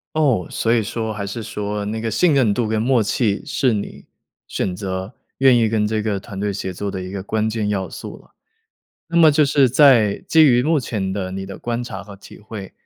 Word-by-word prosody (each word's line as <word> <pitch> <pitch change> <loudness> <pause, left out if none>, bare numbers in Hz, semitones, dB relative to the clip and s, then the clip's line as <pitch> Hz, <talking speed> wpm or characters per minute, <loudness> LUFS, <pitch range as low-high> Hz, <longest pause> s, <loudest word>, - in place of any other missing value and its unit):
哦， 135 - +2
所 115 +1 0
以 115 - +3
说 110 +1 -3
还 100 -1 -5
是 110 +3 -5
说， 105 -1 -4
那 110 +2 -3
个 115 - -2
信 150 - +2
任 125 -7 +3
度 115 +1 -1
跟 110 0 0
默 120 -1 +2
契， 105 -1 0
是 125 -4 +1
你 100 - -5 0.4
选 95 -2 -2
择 95 +2 -5 0.3
愿 130 -2 +6
意 115 -2 +2
跟 110 -1 +1
这 110 0 -1
个 105 -2 -1
团 95 0 -9
队 105 0 -1
协 95 -1 -4
作 100 +3 -4
的 95 -1 -5
一 90 - -7
个 100 -1 -5
关 110 +2 -1
键 110 -2 -2
要 95 -2 -2
素 - - -8
了。 - - -22 0.8
那 170 - -3
么 160 -2 +7
就 150 +1 +3
是 140 -2 +3
在 120 -6 +5
基 160 - +6
于 125 -3 +4
目 155 +2 +2
前 105 -7 -3
的 95 -2 -3
你 95 0 -5
的 95 - -8
观 120 0 -3
察 100 -5 -7
和 100 0 -11
体 100 - -14
会， 105 -2 -9
110 Hz, 245 characters per minute, -20 LUFS, 100-120 Hz, 0.8 s, 么